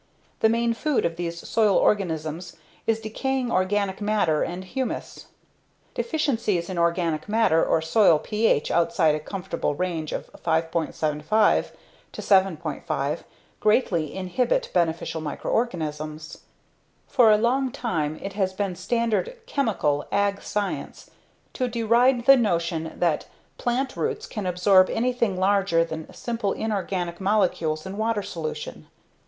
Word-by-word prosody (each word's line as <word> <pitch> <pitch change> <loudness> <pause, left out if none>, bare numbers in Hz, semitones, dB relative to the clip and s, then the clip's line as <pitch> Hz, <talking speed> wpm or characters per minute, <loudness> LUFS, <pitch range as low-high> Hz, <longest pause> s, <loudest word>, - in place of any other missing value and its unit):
The 220 - +4
main 235 +1 +1
food 295 +4 0
of 165 -1 -1
these 170 0 -5
soil 215 -3 +3
organisms 165 -3 0 0.3
is 225 -1 +2
decaying 250 +3 -2
organic 195 +1 0
matter 205 -7 +1
and 180 +2 -3
humus. 255 +7 -5 0.7
Deficiencies 230 - -1
in 180 - -3
organic 170 0 0
matter 215 -7 +3
or 160 - +1
soil 165 0 +5
pH 210 -3 +1
outside 170 -3 +3
a 155 - -1
comfortable 190 -2 -3
range 165 -2 -2
of - - -4 0.2
5.75 160 +3 +1 0.4
7.5 160 -5 0 0.4
greatly 180 - +1
inhibit 245 - 0
beneficial 165 -2 0
microorganisms. 155 -3 -3 0.7
For 245 -5 +5
a 210 - +6
long 255 +4 +1
time 155 -12 -2
it 195 - -5
has 190 -2 0
been 190 -1 -2
standard 235 - -1
"chemical" 200 - 0
ag 200 0 +1
science 205 -1 -4 0.4
to 255 - -1
deride 235 +1 +2
the 275 0 +8
notion 170 -7 -1
that 170 -3 +1 0.3
plant 255 +2 -1
roots 445 0 -2
can 210 - -5
absorb 185 +1 +4
anything 235 -4 0
larger 190 -3 +2
than 160 -1 -7
simple, 230 -4 -2
inorganic 190 -5 -3
molecules 170 -6 +1
in 190 +1 -6
water 220 -1 0
solution. 155 -4 -6
195 Hz, 125 wpm, -25 LUFS, 165-225 Hz, 0.7 s, the